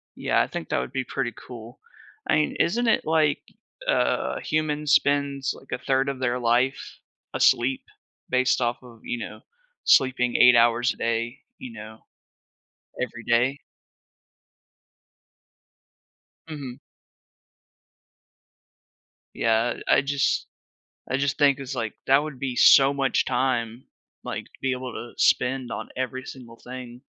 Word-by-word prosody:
Yeah, - - +1
I - - 0
think - - -6
that - - 0
would - - -5
be 130 -1 -2
pretty 125 -1 -3
cool. 120 -1 -12 0.5
I - - +4
mean, 155 - +1
isn't 235 +7 +1
it, - - +2
like, 155 -2 +2 0.5
uh, - - +1
humans 150 -1 -1
spends, 140 -1 +1
like, 135 - -18
1/3 130 +2 0
of 135 -2 -5
their 125 -1 0
life 125 +3 +2 0.6
asleep, 130 +2 +2 0.5
based 130 0 +2
off 120 0 0
of, 115 -3 -15
you 120 - -3
know, - - -8 0.4
sleeping 125 -2 +3
8 125 0 +7
hours 120 +1 +3
a - - -19
day, 115 +2 -2 0.2
you 255 -2 -9
know, 110 - -10 1.0
every - - -4
day? 125 +4 +1 2.9
Mhm. 140 -5 -7 2.5
Yeah, 115 +1 +1
I - - +5
just 140 0 0 0.6
I 130 - +1
just 140 0 0
think 140 -2 +4
it's 135 -1 -6
like 115 -4 -3
that 135 +2 +5
would 150 -4 -7
be, 130 -1 -3
so 135 +2 +7
much 135 -2 +1
time, 120 -2 -1 0.4
like, - - -5
to - - -23
be 135 - 0
able 130 -1 -5
to 120 - -8
spend 125 -1 +2
on 105 +1 -5
every 130 0 -3
single 120 -3 -11
thing 125 -1 -9
130 Hz, 135 wpm, -25 LUFS, 120-140 Hz, 2.9 s, 8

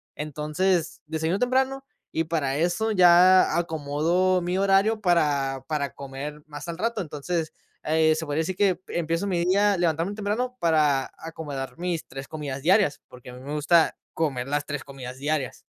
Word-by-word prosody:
Entonces 155 +4 -1
desayuno 160 +3 -1
temprano 265 +2 +1 0.3
y 160 - 0
para 150 -4 -1
eso 175 +7 0
ya 185 -1 +6
acomodo 170 +3 +1
mi 175 +1 -1
horario 200 +3 +3
para 145 -7 +1
para 145 -4 -2
comer 140 +2 -7
más 145 +1 -8
al 170 0 -5
rato. 230 +3 -1
Entonces, 160 0 -3 0.3
eh, 155 0 +3
se 160 +1 -3
podría 145 +1 -1
decir 180 +3 -3
que 190 -4 +2
empiezo 170 +3 -1
mi 175 -2 0
día 200 +1 +3
levantándome 170 +3 0
temprano 220 +5 -2
para 150 -5 +2
acomodar 150 -4 -6
mis 175 -2 -3
3 135 +1 -8
comidas 145 -3 -5
diarias, 185 0 +3
porque 125 0 -13
a - - -9
mí 125 - -10
me 140 +3 -6
gusta 155 +2 +3 0.2
comer 135 -6 -1
las 145 0 -1
3 150 -2 -4
comidas 130 -2 -9
diarias. 145 -2 -2
160 Hz, 165 wpm, -25 LUFS, 145-185 Hz, 0.3 s, ya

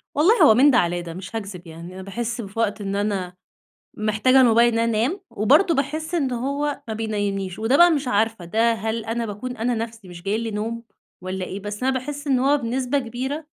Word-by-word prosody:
والله 370 +11 +5
هو 220 - +8
من 270 +6 +6
ده 250 - +4
علي 175 -3 +1
ده 170 -1 -7
مش 185 +5 -8
هاكذب 195 -5 -6
يعني، 165 +2 -10
أنا 190 - -8
باحس 235 +5 -4
في 200 +1 -8
وقت 210 -2 0
إن 195 0 -3
أنا 200 -3 -2 0.6
محتاجة 215 +5 +3
الموبايل 235 -1 +5
إن 230 - +1
أنا 230 - +2 0.2
انام، 360 +7 -3
وبرضه 305 - +3
باحس 310 +4 -2
إن 275 -6 0
هو 280 +4 -2
ما 220 - -3
بينيمنيش 205 -4 -3
وده 230 +5 +2
بقى 345 +1 +7
مش 285 -4 -1
عارفة، 220 -4 0
ده 225 +6 +2
هل 220 +1 -3
أنا 230 +1 -2
باكون 230 +4 -6
أنا 240 +2 0
نفسي 225 -2 -6
مش 175 -1 -11
جاي 200 +3 0
لي 225 0 -3
نوم 225 +3 -4 0.4
والّا 185 0 -4
إيه؟ 190 - -6
بس 205 +3 -6
أنا 265 - +3
باحس 285 +3 -5
إن 265 -3 +3
هو 280 +3 +3
بنسبة 255 +2 -1
كبيرة 265 +5 -4
230 Hz, 215 wpm, -23 LUFS, 205-260 Hz, 0.6 s, هو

